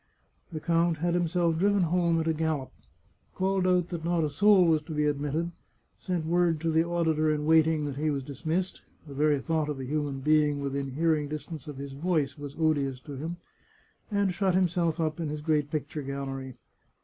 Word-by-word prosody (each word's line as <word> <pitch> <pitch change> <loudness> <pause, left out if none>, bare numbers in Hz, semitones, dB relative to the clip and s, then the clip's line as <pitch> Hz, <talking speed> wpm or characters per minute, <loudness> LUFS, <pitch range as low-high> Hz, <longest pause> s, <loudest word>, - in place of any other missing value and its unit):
The 160 - -4
count 170 0 +1
had 170 +2 0
himself 170 -1 +1
driven 200 0 +3
home 170 0 +2
at 160 - -1
a 160 - +2
gallop, 155 -4 -2 0.6
called 190 0 +1
out 180 -1 +2
that 170 -3 -5
not 170 -1 +1
a 150 - -1
soul 200 +3 +5
was 160 -2 +3
to 155 0 -7
be 150 0 +1
admitted, 150 +3 -1 0.5
sent 180 -4 -2
word 170 -1 +2
to 165 0 0
the 160 +1 +3
auditor 160 -2 +1
in 150 -1 -1
waiting 160 -1 +4
that 140 -2 -4
he 155 +2 0
was 140 -2 -1
dismissed 160 +7 -3 0.2
(the 145 - -10
very 145 0 +2
thought 155 +1 -1
of 145 -2 -3
a 130 - -4
human 145 0 -2
being 150 0 +3
within 140 -1 -3
hearing 155 0 +1
distance 155 +1 -7
of 145 -2 -7
his 140 0 -6
voice 150 -2 0
was 145 -1 -8
odious 145 -5 +1
to 145 +1 -8
him), 160 +6 -5 0.7
and 200 -3 +1
shut 190 -1 +1
himself 175 -2 +1
up 155 0 -1
in 160 -3 -2
his 150 0 -4
great 150 -2 +1
picture 150 -1 -3
gallery. 135 -1 -5
155 Hz, 195 wpm, -28 LUFS, 145-170 Hz, 0.7 s, soul